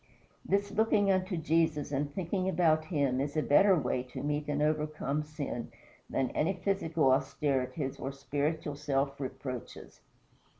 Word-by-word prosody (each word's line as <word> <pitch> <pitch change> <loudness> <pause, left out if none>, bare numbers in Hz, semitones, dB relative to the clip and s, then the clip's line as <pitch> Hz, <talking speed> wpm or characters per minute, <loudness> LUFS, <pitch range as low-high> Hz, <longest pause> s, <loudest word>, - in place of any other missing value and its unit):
This 200 +1 0
looking 210 -2 +3
unto 185 -1 0
Jesus 160 -2 +1
and 145 +1 -1
thinking 185 +3 -1
about 160 -4 +3
him 140 -6 +1
is 145 +2 -3
a 155 - +2
better 190 +7 +6
way 130 -5 0
to 130 +1 -7
meet 150 0 -1
and 145 -1 -1
overcome 150 -1 0
sin 150 -5 -5 0.4
than 130 - 0
any 165 +6 +1
physical 170 -7 +1
austerities 135 0 0
or 135 - -3
spiritual 145 +2 -2
self 140 -1 -1
reproaches. 130 -3 -7
150 Hz, 140 wpm, -31 LUFS, 140-165 Hz, 0.4 s, better